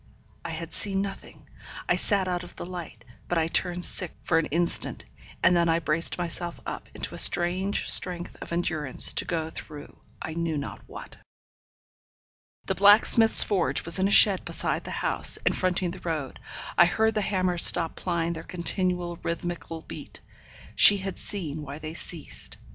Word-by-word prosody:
I - - -6
had 165 +1 -7
seen 195 -1 -1
nothing; 195 -1 -10 0.4
I - - +2
sat 200 -3 0
out 180 -1 -3
of 175 - -13
the - - -7
light; 170 -10 -9 0.2
but 175 - -2
I 160 - +1
turned 175 +1 -1
sick 180 -4 -2
for 165 - +1
an 165 - -2
instant, 170 +2 -2 0.4
and 180 - +4
then 170 -1 +2
I 165 - +2
braced 165 0 -1
myself 175 0 -4
up - - -7
into - - -5
a - - -3
strange 185 +3 +3
strength 175 -2 +3
of - - -9
endurance 160 -5 +1
to - - +1
go 160 -2 -3
through 150 -2 -11 0.2
I 160 - -6
knew 165 -1 -3
not 140 - -7
what. - - -11 1.5
The - - -1
blacksmith's 210 +3 +6
forge 195 -4 -1
was 170 +2 -1
in 190 - +2
a - - -2
shed 200 -2 +5
beside - - -3
the - - -7 0.2
house, - - +4
and - - +1
fronting 185 -1 -1
the 185 - -8
road. 155 -6 -5 0.4
I 175 - +8
heard 220 +5 0
the 215 - -1
hammers 185 -3 -1
stop 165 -2 +3
plying 170 -2 -3
their 160 - -7
continual 180 0 -3
rhythmical 170 -1 -5
beat. - - -11 0.6
She 205 - +8
had 195 0 -6
seen 160 -7 -5
why 145 -1 -8
they 155 0 -8
ceased. 165 -2 -5
175 Hz, 175 wpm, -25 LUFS, 165-185 Hz, 1.5 s, I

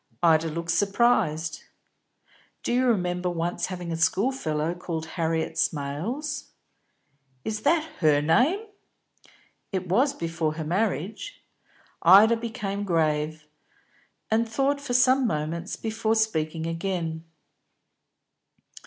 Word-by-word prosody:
Ida 165 -1 +4
looked 165 +1 -3
surprised. 195 -4 +1 1.0
"Do - - -1
you 255 +1 +2
remember 180 -5 0
once 175 0 -2
having 180 -2 -5
a - - -1
schoolfellow 165 - 0
called 170 -2 -5
Harriet 165 -2 -1
Smales?" 215 - -2 1.0
"Is 215 -1 -3
that 315 +5 +3 0.2
her 155 -4 +4
name?" 255 - +2 1.1
"It 190 -2 -3
was, 255 +11 +2
before 165 - -2
her 160 - -4
marriage." 190 - -2 0.6
Ida 205 +7 +7
became 220 -4 -4
grave, 155 -3 0 0.8
and 225 +1 +2
thought 275 +4 0
for 250 -4 -3
some 255 +1 +4
moments 165 +2 -3
before 220 0 -1
speaking 160 -7 0
again. 165 -1 -3
180 Hz, 105 wpm, -26 LUFS, 160-225 Hz, 1.1 s, Ida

